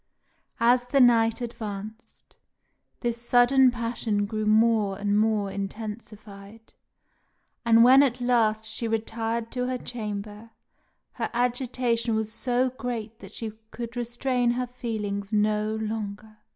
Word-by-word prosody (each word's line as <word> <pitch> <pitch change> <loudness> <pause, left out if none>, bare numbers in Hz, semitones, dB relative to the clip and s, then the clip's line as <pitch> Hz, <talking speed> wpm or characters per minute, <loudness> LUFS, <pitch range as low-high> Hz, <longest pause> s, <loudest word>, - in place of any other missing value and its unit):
As 245 +1 +4
the 275 +3 +1
night 230 -2 +4
advanced, 220 -1 -8 0.7
this 235 -1 -2
sudden 245 +2 +5
passion 230 -3 -2
grew 215 0 -3
more 215 -2 +3
and 205 0 0
more 215 -2 +1
intensified; 210 +1 -8 0.9
and 230 -1 +6
when 260 +3 +8
at 255 -3 +1
last 225 -3 +2
she 220 +1 -3
retired 225 +1 -2
to 250 -1 -2
her 255 0 -1
chamber, 210 -2 -6 0.6
her - - -4
agitation 240 -1 0
was 220 0 -1
so 250 +1 +1
great 230 -3 -5
that - - -12
she 225 -2 -4 0.2
could 235 +1 -7
restrain 245 +1 0
her 250 +1 0
feelings 210 -5 -4
no 215 0 +1
longer. 215 -1 -5
225 Hz, 125 wpm, -26 LUFS, 215-245 Hz, 0.9 s, when